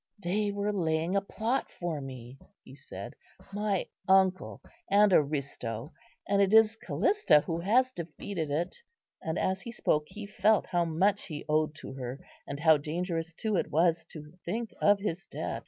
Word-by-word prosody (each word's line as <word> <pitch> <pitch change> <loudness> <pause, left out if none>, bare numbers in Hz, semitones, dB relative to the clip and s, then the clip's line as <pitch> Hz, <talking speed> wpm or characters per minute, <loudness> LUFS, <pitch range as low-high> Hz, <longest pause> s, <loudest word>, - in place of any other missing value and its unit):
"They 205 +2 -1
were 205 +1 -1
laying 165 -1 0
a 200 - +3
plot 225 +6 -2
for 170 -4 -4
me," 130 -1 -9 0.2
he 130 - -13
said, 140 - -9 0.4
"my 205 -2 0 0.2
uncle 190 -1 +3 0.3
and 205 -1 +5
Aristo; 140 -4 -1 0.3
and 200 0 +3
it 195 -1 +3
is 220 0 +6
Callista 385 - +3
who 165 +1 -3
has 245 +8 +3
defeated 170 - -5
it." 160 +5 -2 0.4
And 160 +2 -3
as 190 0 0
he 235 - -7
spoke, 150 -10 +1
he 210 -1 -8
felt 210 +1 +2
how 175 -1 +1
much 190 +5 +1
he 150 -4 -6
owed 155 0 +1
to 145 - -8
her, 130 0 -6 0.3
and 140 - -5
how 160 -1 +6
dangerous 165 +3 -3
too 215 +2 -1
it - - -1
was 165 +1 +2
to 150 -2 -11
think 225 +5 -3
of 205 0 +5
his 195 -2 -4
debt. - - -4
175 Hz, 170 wpm, -30 LUFS, 155-205 Hz, 0.4 s, is